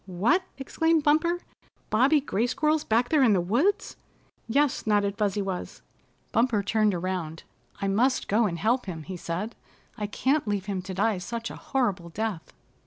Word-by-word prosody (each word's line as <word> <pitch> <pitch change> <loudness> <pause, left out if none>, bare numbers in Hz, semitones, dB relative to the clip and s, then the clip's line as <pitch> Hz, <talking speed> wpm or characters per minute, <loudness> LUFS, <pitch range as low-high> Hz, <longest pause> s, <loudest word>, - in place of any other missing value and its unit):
"What!" 205 - +2 0.2
exclaimed 325 +3 +1
Bumper. 330 +4 +2 0.5
"Bobby 270 +7 +4
Gray 235 -4 0
Squirrel's 305 +4 +1
back 235 +3 +1
there 305 -3 +3
in 235 -5 +5
the 190 - +3
woods!" 265 - 0 0.5
"Yes," 280 +1 +1
nodded 205 -1 +2
Fuzzy 205 -1 0
Wuzz. 190 -2 -5 0.5
Bumper 230 -3 +2
turned 210 -1 +2
around. 170 -3 -4 0.4
"I 200 - -1
must 240 +7 +1
go 220 +2 +3
and 170 -3 -3
help 230 +6 +1
him," 165 -4 -5
he 185 +4 -7
said. 180 +6 -4 0.4
"I 210 - -2
can't 265 +5 0
leave 205 -2 -1
him 195 -3 -3
to 190 0 -7
die 205 0 +1
such 230 +5 -5
a - - -8
horrible 200 -10 -1
death." 200 -2 -4
215 Hz, 170 wpm, -27 LUFS, 190-260 Hz, 0.5 s, in